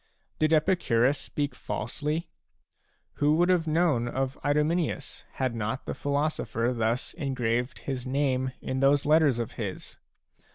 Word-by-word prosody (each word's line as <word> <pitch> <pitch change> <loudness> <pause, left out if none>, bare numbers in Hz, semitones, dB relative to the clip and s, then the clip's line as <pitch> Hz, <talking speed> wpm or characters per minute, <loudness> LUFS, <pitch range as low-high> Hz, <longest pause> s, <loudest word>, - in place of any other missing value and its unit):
Did 155 0 +2
Epicurus 150 -6 +3
speak 145 -1 -3
falsely? 155 +3 -3 0.9
Who 150 +1 +3
would 175 +2 +3
have 175 -3 +2
known 155 -7 +2
of 130 +2 -2
Idomeneus, 150 +3 0
had 130 -2 -1
not 115 +3 -3
the - - -3
philo 145 +1 0
sopher 115 -4 -1
thus 115 +2 -1
engraved 125 -5 -1
his 130 -2 -4
name 130 -1 0
in 130 - -2
those 140 +1 +4
letters 150 -4 +4
of 115 -2 -3
his 100 -4 -6
140 Hz, 135 wpm, -28 LUFS, 125-155 Hz, 0.9 s, those